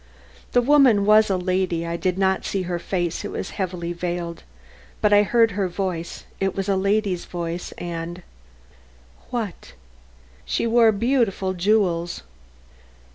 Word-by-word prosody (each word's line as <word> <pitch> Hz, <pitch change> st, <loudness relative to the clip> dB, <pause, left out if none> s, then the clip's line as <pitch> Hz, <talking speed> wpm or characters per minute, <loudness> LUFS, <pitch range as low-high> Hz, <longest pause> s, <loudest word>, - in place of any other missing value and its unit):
"The 245 Hz, -, +4 dB
woman 260 Hz, -7 st, +5 dB
was 215 Hz, +1 st, +5 dB
a 190 Hz, -, +1 dB
lady. 180 Hz, -2 st, -1 dB
I 170 Hz, 0 st, -3 dB
did 180 Hz, +1 st, -1 dB
not 190 Hz, -1 st, +1 dB
see 195 Hz, -2 st, -2 dB
her 175 Hz, -1 st, -3 dB
face, 175 Hz, 0 st, -2 dB
it 205 Hz, -, -4 dB
was -, -, -5 dB
heavily 175 Hz, -3 st, -3 dB
veiled, 175 Hz, -1 st, -4 dB, 0.6 s
but 210 Hz, -1 st, +3 dB
I 205 Hz, -, +7 dB
heard 225 Hz, +2 st, +3 dB
her 195 Hz, 0 st, -1 dB
voice; 180 Hz, -2 st, -4 dB
it 195 Hz, -1 st, -1 dB
was 195 Hz, 0 st, -2 dB
a 200 Hz, -, +2 dB
lady's 195 Hz, -1 st, 0 dB
voice 170 Hz, 0 st, -5 dB
and 170 Hz, +1 st, -6 dB, 0.5 s
" 60 Hz, 0 st, -29 dB
"What?" 225 Hz, -7 st, -5 dB, 0.7 s
"She -, -, -1 dB
wore 230 Hz, -1 st, +5 dB
beautiful 215 Hz, -4 st, 0 dB
jewels." 180 Hz, -3 st, +1 dB
185 Hz, 145 wpm, -23 LUFS, 175-210 Hz, 0.7 s, I